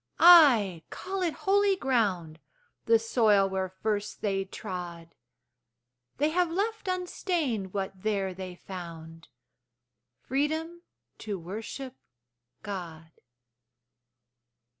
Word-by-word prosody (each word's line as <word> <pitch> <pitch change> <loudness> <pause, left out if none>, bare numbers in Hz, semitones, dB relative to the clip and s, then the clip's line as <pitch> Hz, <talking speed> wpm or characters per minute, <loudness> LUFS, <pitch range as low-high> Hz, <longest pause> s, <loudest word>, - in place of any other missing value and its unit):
Ay, 255 - +7
call 385 +1 -5
it 340 -3 0
holy 400 0 +4
ground, 200 - 0 0.5
The 230 0 +6
soil 220 -3 +3
where 190 -1 -2
first 210 +2 -3
they 195 -2 -1
trod. 175 -3 -7 1.0
They 295 +3 +2
have 350 +1 +1
left 415 +4 -2
unstained 345 - -2
what 190 -1 -4
there 195 -3 -1
they 185 -1 -7
found 165 -3 -9 1.0
Freedom 315 +5 -2 0.4
to 210 -3 -4
worship 225 +9 -7 0.7
God. 170 -6 -7
210 Hz, 95 wpm, -28 LUFS, -, 1.0 s, Ay